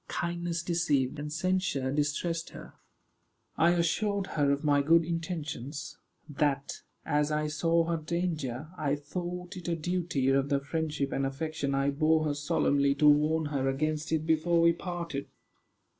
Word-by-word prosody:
Kindness 170 0 -2
deceived, 150 -6 0
and 150 0 -5
censure 170 -5 0
distressed 150 +3 -1
her. - - -11 0.8
I 165 - +4
assured 195 +4 +1
her 145 -2 +2
of 140 +2 -1
my 145 -1 +3
good 165 +3 +4
intentions; 160 -5 -5 0.3
that, 145 -2 -1 0.2
as 150 -1 +1
I 150 0 0
saw 165 +2 +2
her 165 0 -1
danger, 155 -4 -3
I 145 -2 +1
thought 180 +5 -6
it 175 - -7
a 170 - +1
duty 170 -5 -1
of 135 +1 +2
the 140 -1 +2
friendship 150 -1 -2
and 135 - -1
affection 140 +1 -2
I 135 +1 +2
bore 155 +2 +2
her 150 - 0
solemnly 140 -1 +1
to 150 +1 +4
warn 150 +2 +4
her 135 -1 +1
against 155 +3 -1
it 160 -1 0
before 165 +1 +2
we 170 0 +5
parted. 170 -5 -5
155 Hz, 155 wpm, -29 LUFS, 145-170 Hz, 0.8 s, we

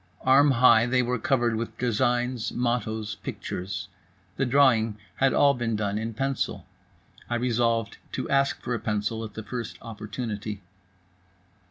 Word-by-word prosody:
Arm 140 +3 +6
high 120 -3 +5
they 125 0 +2
were 125 0 -1
covered 120 -1 +1
with 115 0 -4
designs, 120 0 0
mottos, 110 -3 -1
pictures. 90 0 -5 0.5
The 135 - 0
drawing 120 -5 +4 0.2
had 135 -1 +3
all 140 -1 +5
been 120 -3 -1
done 105 0 -1
in 110 0 -4
pencil. 135 +2 -2 0.6
I 120 - 0
resolved 115 -2 0
to - - -3
ask 140 0 +2
for 125 - -3
a 120 - -1
pencil 110 +1 -2
at 110 -2 -8
the 110 - -5
first 120 +1 -5
opportunity. 105 -2 -6
115 Hz, 145 wpm, -26 LUFS, 110-125 Hz, 0.6 s, Arm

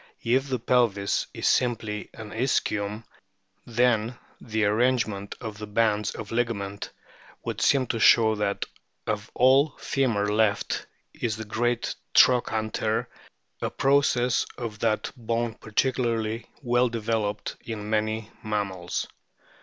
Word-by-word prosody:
If 130 +4 +2
the 130 - 0
pelvis 115 -5 +1
is - - -2
simply 110 -4 0
an 110 -2 -9
ischium, 105 -3 -1 0.6
then 120 0 +2 0.3
the 110 -2 0
arrangement 110 -2 +1
of 110 -3 -7
the 105 - -6
bands 105 -1 +1
of 110 -1 -7
ligament 100 -4 -2 0.5
would - - -4
seem 135 -2 +4
to 115 - -2
show 110 0 +6
that 105 -2 -1 0.4
of - - -2
all 135 +4 +4
femur 115 -7 0
left 105 -1 +1 0.3
is 110 -2 -2
the 110 - -6
great 120 +2 0 0.2
trochanter, 110 -3 +3 0.5
a - - 0
process 130 -3 +2
of 115 -4 -5
that 110 -1 0
bone 115 -1 -1
particularly 115 -1 -1 0.2
well 120 0 +3
developed 110 -2 -2
in 105 -2 -5
many 110 0 -1
mammals. 100 -5 -2
110 Hz, 120 wpm, -26 LUFS, 105-120 Hz, 0.6 s, show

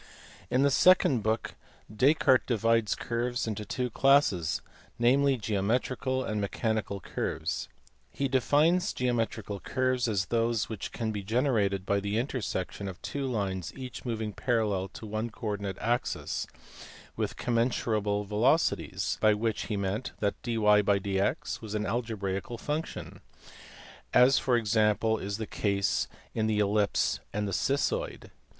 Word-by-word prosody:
In 130 +2 +3
the 140 - +4
second 150 -6 +5
book 110 +2 -1 0.4
Descartes 130 +1 +4
divides 115 -2 +2
curves 120 +1 -2
into 105 -1 -4
two 125 +3 -2
classes; 105 - +3 0.3
namely, 135 +3 +3
geometrical 125 +5 -1
and 105 -1 -2
mechanical 110 0 -1
curves. - - -3 0.4
He 140 - -2
de 130 -1 +2
fines 170 - +3
geometrical 115 -4 -1
curves 130 +1 0
as 100 -4 0
those 115 +1 0
which 110 -4 -5
can 110 -2 -2
be 105 -1 -3
generated 105 -3 +1
by 100 0 +1
the 100 +2 -2
intersection 110 -6 -3
of 95 -2 -7
two 140 -1 -3
lines 95 -7 -2
each 130 -2 -7
moving 110 -3 -3
parallel 105 -6 0
to 105 - -10
one 110 +2 -3
co 110 - -10
ordinate 100 -2 -3
axis 120 +1 -1 0.7
with - - -3
"commensurable" 110 -4 0
velocities, 105 - +1
by 110 -1 +5
which 110 0 -1
he 105 - -2
meant 100 +5 -2
that 100 -1 -1
dyjdx 105 -3 +1
was 110 -1 -6
an 105 0 -1
algebraical 110 -2 -3
function, 150 +6 -4 0.9
as 125 +2 +6
for 125 -2 +2
example 110 0 +2
is 100 +1 -3
the 110 - -3
case 100 -2 0 0.3
in 110 -1 0
the 110 -1 +1
ellipse 105 0 +2
and 105 0 -2
the 100 - -3
cissoid. 465 - -1
110 Hz, 135 wpm, -29 LUFS, 100-125 Hz, 0.9 s, as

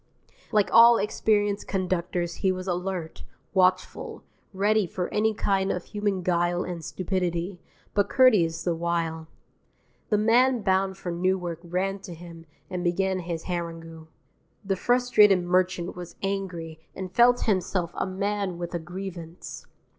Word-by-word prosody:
Like 210 -3 +2
all 235 0 +8
experienced 205 0 0
conductors 180 -2 -2
he 190 - +3
was 185 0 -4
alert, 180 -2 -3 0.3
watchful, 185 -1 +1 0.3
ready 205 +1 +2
for 180 +1 -4
any 220 +1 +2
kind 195 -1 +1
of 180 - -3
human 205 -3 -2
guile 175 0 +1
and 175 -2 -6
stupidity, 180 0 -2 0.3
but 205 0 +2
courteous 210 -11 +4
the 175 - +1
while. 165 -1 -2 0.8
The 210 - +3
man 235 +2 +3
bound 190 -1 +1
for 180 - -5
Newark 175 -1 -1
ran 185 +3 -2
to 180 -3 -9
him 165 -1 -12 0.2
and 180 -1 -4
began 190 +2 +1
his 170 -2 -4
harangue. 165 -2 -5 0.6
The 195 0 +1
frustrated 210 -4 +4
merchant 180 0 0
was 175 -1 -9
angry 180 -5 -3 0.2
and 185 -1 -6
felt 245 +2 +5
himself 185 -4 0
a - - -2
man 200 -1 -2
with 175 0 -5
a 170 - -1
grievance. 175 -1 -8
185 Hz, 140 wpm, -26 LUFS, 175-200 Hz, 0.8 s, all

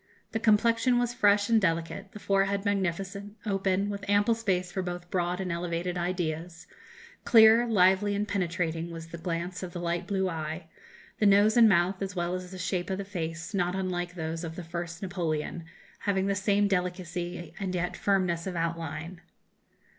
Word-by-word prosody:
The 225 - -1
complexion 230 +3 +3
was 240 0 0
fresh 205 -3 +4
and 225 -1 +4
delicate, 175 +3 -1
the - - -9
forehead 195 0 +1
magnificent, 200 +1 -2
open, 195 -1 +1
with 200 -1 -6
ample 205 +3 +4
space 185 -5 -1
for 190 - -2
both 175 -1 -6
broad 180 0 0
and 185 -1 -2
elevated 170 +1 -2
ideas; 175 -1 -3 0.6
clear, 225 0 +7
lively, 200 -1 +4
and 205 +1 -1
penetrating 170 -4 -1
was 165 -1 -8
the 170 - -8
glance 175 +2 -3
of 180 -2 -6
the 175 - -4
light 175 +1 -2
blue 190 -2 0
eye; 160 0 -4 0.5
the 210 - +4
nose 205 +2 +5
and 230 -2 +7
mouth, 185 +1 +2
as 195 -1 -3
well 175 0 -1
as 185 0 -4
the 190 - -8
shape 180 0 -2
of 190 - -1
the 200 - -4
face, 170 -1 -5
not 180 -2 0
unlike 180 -2 -2
those 165 0 -4
of 165 -1 -5
the 180 - -6
first 170 +1 -6
Napoleon, 170 -3 -2 0.3
having 195 -1 0
the 200 - +1
same 200 +1 +2
delicacy 180 -3 -3
and 190 -2 -2
yet 175 0 -1
firmness 185 -3 0
of 185 - -4
outline. 165 +1 -3
185 Hz, 175 wpm, -28 LUFS, 170-200 Hz, 0.6 s, clear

